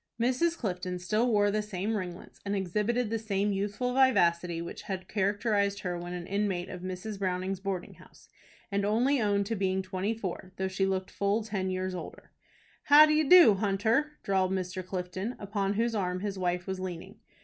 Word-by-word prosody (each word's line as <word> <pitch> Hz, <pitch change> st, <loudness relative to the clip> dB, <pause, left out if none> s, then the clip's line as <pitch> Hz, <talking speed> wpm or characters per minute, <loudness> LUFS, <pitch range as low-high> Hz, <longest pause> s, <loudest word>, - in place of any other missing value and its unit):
Mrs. 260 Hz, +8 st, +1 dB
Clifton 180 Hz, -4 st, -3 dB
still 215 Hz, +7 st, 0 dB
wore 205 Hz, -1 st, +3 dB
the 215 Hz, +1 st, 0 dB
same 210 Hz, +1 st, -3 dB
ringlets, 180 Hz, -3 st, -6 dB
and 200 Hz, 0 st, -2 dB
exhibited 210 Hz, +5 st, 0 dB
the 225 Hz, -, 0 dB
same 205 Hz, -1 st, 0 dB
youthful 205 Hz, +5 st, -2 dB
vivacity 180 Hz, -10 st, +3 dB
which 170 Hz, 0 st, -6 dB
had 185 Hz, -2 st, -5 dB
characterized 200 Hz, 0 st, 0 dB
her 180 Hz, -2 st, -2 dB
when 175 Hz, 0 st, -6 dB
an 180 Hz, -1 st, -5 dB
inmate 195 Hz, -2 st, -1 dB
of 180 Hz, -, -7 dB
Mrs. 185 Hz, +3 st, -5 dB
Browning's 185 Hz, 0 st, -1 dB
boarding 190 Hz, -2 st, -4 dB
house, -, -, -18 dB, 0.4 s
and 200 Hz, 0 st, 0 dB
only 240 Hz, +6 st, +2 dB
owned 200 Hz, -1 st, +1 dB
to 225 Hz, -, -2 dB
being 190 Hz, -1 st, 0 dB
twenty 190 Hz, +3 st, -2 dB
four, 185 Hz, -3 st, -6 dB
though 190 Hz, -, -1 dB
she 190 Hz, +1 st, 0 dB
looked 190 Hz, -1 st, -2 dB
full 200 Hz, +2 st, 0 dB
ten 195 Hz, -3 st, -2 dB
years 185 Hz, 0 st, -2 dB
older. 180 Hz, -, -8 dB, 0.5 s
"How 295 Hz, +2 st, +9 dB
d'e 305 Hz, 0 st, +3 dB
do, 340 Hz, -, +8 dB
Hunter?" 220 Hz, +9 st, +1 dB
drawled 190 Hz, -1 st, +1 dB
Mr. 185 Hz, 0 st, -3 dB
Clifton, 185 Hz, +5 st, -4 dB
upon 200 Hz, -1 st, -2 dB
whose 230 Hz, +2 st, +1 dB
arm 185 Hz, -3 st, -1 dB
his 200 Hz, -1 st, -3 dB
wife 180 Hz, -1 st, -1 dB
was 190 Hz, -1 st, -4 dB
leaning. 185 Hz, +3 st, -7 dB
195 Hz, 180 wpm, -29 LUFS, 185-215 Hz, 0.5 s, How